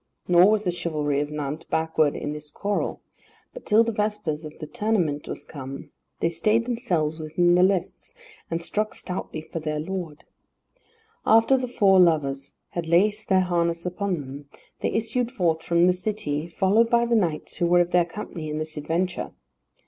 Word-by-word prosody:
Nor 180 +2 +6
was 215 0 +2
the 180 - 0
chivalry 150 -5 -1
of 145 0 -2
Nantes 150 +1 -5
backward 160 -2 +1
in 145 - -4
this 150 0 -8
quarrel, 205 +5 -2 0.5
but - - -11
till 220 +2 +6
the 230 - -1
vespers 210 -8 -2
of 150 - -9
the 155 - -6
tournament 170 -6 -1
was - - -6
come, 135 -2 -8 0.3
they 165 - +2
stayed 215 +7 +1
themselves 175 -11 -1
within 165 +3 +2
the 180 - +5
lists, 190 - 0 0.3
and 165 0 -2
struck 215 +4 -2
stoutly 180 -4 -5
for 160 +1 -6
their 155 -1 -3
lord. 165 -2 -5 1.0
After 225 +4 +5
the 255 -1 -1
four 200 -6 +4
lovers 140 -6 +2 0.2
had 170 -2 -4
laced 210 +6 +2
their 190 -1 +5
harness 170 -1 0
upon 180 -2 -2
them, 140 +1 -10 0.3
they - - 0
issued 230 +2 -1
forth 170 -10 0
from 170 +1 +3
the 180 - +4
city, 180 -6 -3
followed 205 +6 +2
by 235 0 +3
the 235 - 0
knights 170 -8 -1
who 175 - +1
were 175 +1 +5
of 175 0 -1
their 180 -1 +4
company 170 -3 -7
in 150 - -3
this 155 0 -5
adventure. 170 +4 -2
175 Hz, 180 wpm, -25 LUFS, 155-210 Hz, 1.0 s, Nor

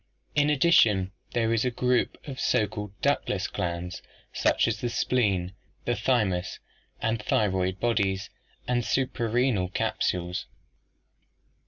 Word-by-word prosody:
In 145 0 +3
addition 115 - +4 0.2
there 115 -1 +1
is 115 - +2
the 125 - +2
group 125 +1 +1
of 135 -2 -6
so 110 - +2
called 105 0 -6
ductless - - +1
glands, 90 +1 -3 0.3
such - - +2
as 110 -2 -2
the 120 - -1
spleen, 100 -7 +1 0.3
the 120 - +1
thymus 105 -6 0 0.5
and 115 -1 0
thyroid 95 -3 +1
bodies, 100 -5 0 0.4
and 125 -1 +2
the - - -6
suprarenal 120 -6 +1
capsules. 90 0 -1
110 Hz, 125 wpm, -27 LUFS, 95-120 Hz, 0.5 s, addition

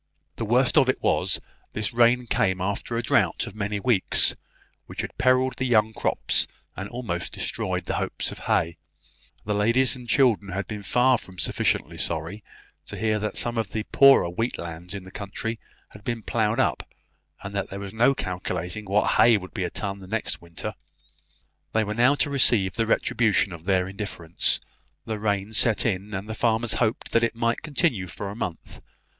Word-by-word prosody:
The 115 - -2
worst 125 +6 +4
of 130 -3 +3
it 130 - +1
was, 90 0 +1 0.3
this 105 +1 -2
rain 120 +1 +4
came 95 -4 +1
after 100 +5 -2
a 120 - -1
drought - - +2
of - - -8
many 105 -1 -2
weeks, 105 -4 +4 0.5
which - - -5
had - - -7
perilled 130 0 +3
the 130 - -1
young 110 -2 +3
crops, - - +1 0.3
and 95 +1 -6
almost 115 -8 -4
destroyed - - -2
the - - -2
hopes - - -2
of - - -9
hay; 85 0 0 0.7
the 105 - 0
ladies 115 +6 +3
and 125 -2 -10
children 105 -6 +3
had 100 +1 -2
been 105 -1 -5
far 125 +4 +3
from 95 -1 -12
sufficiently - - 0
sorry 85 +6 -3 0.4
to - - -6
hear 110 -1 +1
that 105 +1 -3
some 120 -1 -1
of 105 -5 -3
the 110 - -1
poorer 140 -9 +7
wheat 115 +8 -2
lands 85 +2 -7
in 100 - -6
the 95 - -12
county 110 +3 -5 0.3
had 105 - -14
been 115 -1 -3
ploughed 110 +2 0
up, - - +1 0.6
and 100 - -6
that 100 -1 -2
there 100 - -6
was 100 0 -7
no 120 +5 +4
calculating 90 0 -4
what 100 +2 +2
hay 115 -2 +6
would 95 -2 -9
be 100 - -2
a - - -2
ton 100 -1 -4
the 95 - -11
next 110 +3 -2
winter. 85 -1 -6 1.0
They 110 - +3
were 105 0 -3
now 125 +6 +4
to 145 - 0
receive 115 -9 +3
the 115 +3 -1
retribution 110 -4 +2
of 85 -1 -10
their 95 -1 +2
indifference; 95 -4 -2 0.4
rain 105 -2 -1
had 110 - -9
set 110 -1 +2
in, 100 -2 -1
and 95 +2 -5
the 110 - -4
farmers 115 0 +1
hoped 115 0 0
that 115 - +3
it 115 0 0
might 115 0 0
continue 135 - 0
for 100 +3 -6
a - - -8
month. 90 -7 -6
105 Hz, 190 wpm, -25 LUFS, 95-120 Hz, 1.0 s, poorer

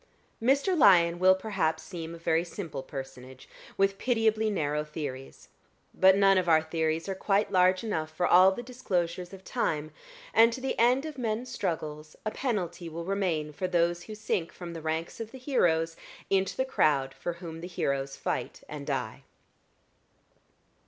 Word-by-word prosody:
Mr. 275 - +3
Lyon 175 - +5
will 185 +1 +6
perhaps 190 -6 -1
seem 170 -3 -7
a - - -10
very 165 0 +1
simple 175 -4 -6
personage, 130 -1 -9 0.3
with 195 0 +2
pitiably 220 -3 +2
narrow 150 -6 -1
theories; 145 -3 -7 0.4
but 190 +1 +5
none 195 -1 +5
of 180 -2 -1
our 160 -1 +5
theories 160 +1 -1
are 195 - -1
quite 200 +2 0
large 185 0 +4
enough 160 -8 -2
for 155 +3 -1
all 185 +2 +7
the 240 +5 -5
disclosures 180 -8 -2
of 190 -1 -11
time, 155 -3 -2 0.4
and 230 +1 +6
to 260 - -5
the 265 +1 -2
end 250 +5 +4
of 305 -4 -7
men's 235 +1 -2
struggles 155 -8 -4
a 215 - -1
penalty 180 -10 -3
will 165 +1 -6
remain 175 -6 -1
for 185 +5 -2
those 175 -1 +1
who 215 - -8
sink 195 -5 -2
from 175 -2 -8
the 165 - -7
ranks 160 +1 -3
of 225 -1 -5
the 260 - -10
heroes 165 - +1 0.4
into 190 -1 +1
the 260 - +1
crowd 140 - +1
for 155 +6 -4
whom 165 -2 -8
the 175 - -6
heroes 140 -5 -2
fight - - -4
and - - -7
die. - - -3
175 Hz, 170 wpm, -28 LUFS, 160-210 Hz, 0.4 s, all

